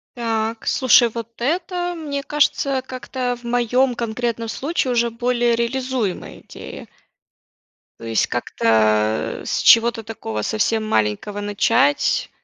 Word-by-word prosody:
Так, 225 -1 -2
слушай, 250 -2 +5
вот 230 0 -6
это, 350 +5 -1
мне 285 -4 -4
кажется, 280 -2 +1
как-то 255 -1 -4
в - - -21
моём 245 +2 +1
конкретном 230 0 -3
случае 265 +2 -2
уже 235 0 +2
более 240 0 +1
реализуемая 235 -3 -3
идея. - - -10 1.1
То 115 - -10
есть 115 -1 +1
как-то, 110 -2 +1
с - - -2
чего-то 230 0 +5
такого 110 - -5
совсем 215 - 0
маленького 200 - -1
начать, 230 +7 +1
235 Hz, 115 wpm, -20 LUFS, 215-260 Hz, 1.1 s, слушай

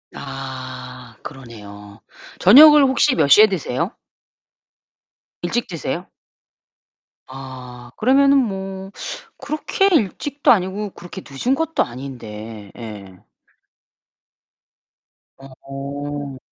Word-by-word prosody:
아 130 -3 -8
그러네요. 105 -6 -11 0.4
저녁을 295 - +9
혹시 265 +1 +3
몇 155 - +3
시에 210 +10 +8
드세요? 170 - -3 1.5
일찍 240 - -1
드세요? 165 -6 -4 1.2
아 130 -2 -10
그러면은 275 +4 +4
뭐 195 -5 -3 0.5
그렇게 305 +6 -1
일찍도 290 - +1
아니고 200 0 0
그렇게 175 +2 -10
늦은 145 - -1
것도 325 +2 0
아닌데. 115 -5 -9
예. 100 -5 -10 2.1
어. 140 +1 -7
140 Hz, 175 characters per minute, -20 LUFS, -, 2.1 s, 저녁을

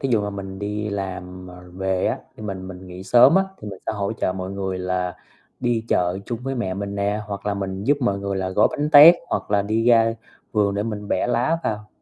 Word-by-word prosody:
thí 135 - -1
dụ 110 - +3
mà 105 - -3
mình 95 -1 -7
đi 105 +1 -3
làm, 90 -2 -5
ờ, 90 0 -12
về 95 -1 -1
á, - - 0 0.2
khi 110 - -10
mình 95 -2 -5
mình 95 0 -10
nghỉ 90 +1 -9
sớm 120 - +6
á, 190 - +4
thì 105 - -8
mình 95 - -8
sẽ - - 0
hỗ 100 0 -2
trợ 95 -4 -1
mọi 95 0 -5
người 95 -1 -3
là 90 -1 -2 0.4
đi 120 -2 0
chợ 90 +1 +1
chung 120 -2 -3
với 135 +1 -3
mẹ 95 -7 -2
mình 100 0 -4
nè, 100 +1 -1
hoặc 100 0 -6
là 100 - 0
mình 95 0 -4
giúp 145 +2 +3
mọi 100 -6 +1
người 100 0 -3
là 95 -1 -2
gói 95 - +4
bánh 150 +1 -2
tét, 155 +3 +10
hoặc - - -3
là 100 -1 +3
đi 110 +2 0
ra 115 -1 +5 0.4
vườn 100 -2 +2
để 100 - 0
mình 105 -2 -5
bẻ - - 0
lá 125 +8 +1
vào. 105 -1 -3
100 Hz, 250 wpm, -22 LUFS, 95-110 Hz, 0.4 s, tét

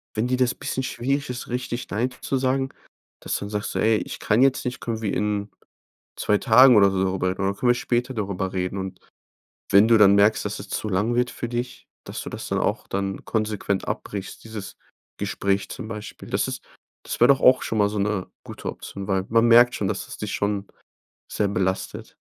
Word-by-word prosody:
wenn 110 +3 0
dir 125 0 +1
das 125 -1 +2
bisschen 130 - -3
schwierig 135 +3 -2
ist, 125 0 -5
richtig 125 0 -4
„Nein“ 115 +5 0
zu 135 - -1
sagen, 130 +1 0 0.5
dass - - -2
du - - -3
dann 100 - -5
sagst 105 0 -3
so: - - -2
„Ey, 110 0 +3
ich - - -6
kann 105 +4 +2
jetzt 135 0 +3
nicht, 125 0 -3
können 115 -2 -3
wir 105 -3 -1
in 105 0 -1 0.7
2 105 - +2
Tagen 125 +3 +7
oder 100 -1 +6
so 95 -1 0
drüber 95 -1 0
reden? 95 +1 -4
Oder 100 - -1
können 120 - +3
wir - - +5
später 125 +2 -1
darüber 95 -3 -3
reden?“ 90 +1 -2
Und, 95 -1 -6 0.7
wenn 100 +3 +7
du 115 - +6
dann 100 -1 +7
merkst, 105 +2 +4
dass - - -3
es - - -9
zu 110 - -3
lang 105 +5 0
wird 125 +1 +1
für 120 - -5
dich, 120 +1 -5 0.2
dass - - -6
du - - -6
das - - -7
dann - - 0
auch - - -1
dann 95 0 -3
konsequent 105 -3 -1
abbrichst, 100 -2 -5
dieses 110 -3 -8 0.4
Gespräch 100 0 -1
zum 125 -4 -7
Beispiel. 105 -2 -8
Das - - 0
ist - - -5 0.4
das - - -4
wär 120 - +7
doch 135 -1 +5
auch 130 0 +6
schon 110 - -2
mal 100 -1 +4
so 105 0 -4
'ne 100 -2 -1 0.2
gute - - -7
Option, 100 -1 -7
weil 95 -2 0
man 115 +1 +4
merkt 120 +1 +7
schon, 100 - -1
dass - - -3
es - - -8
dich - - -4
schon 100 -1 -1 0.7
sehr 105 -2 +1
belastet. 95 -1 -2
105 Hz, 220 wpm, -24 LUFS, 100-120 Hz, 0.7 s, Tagen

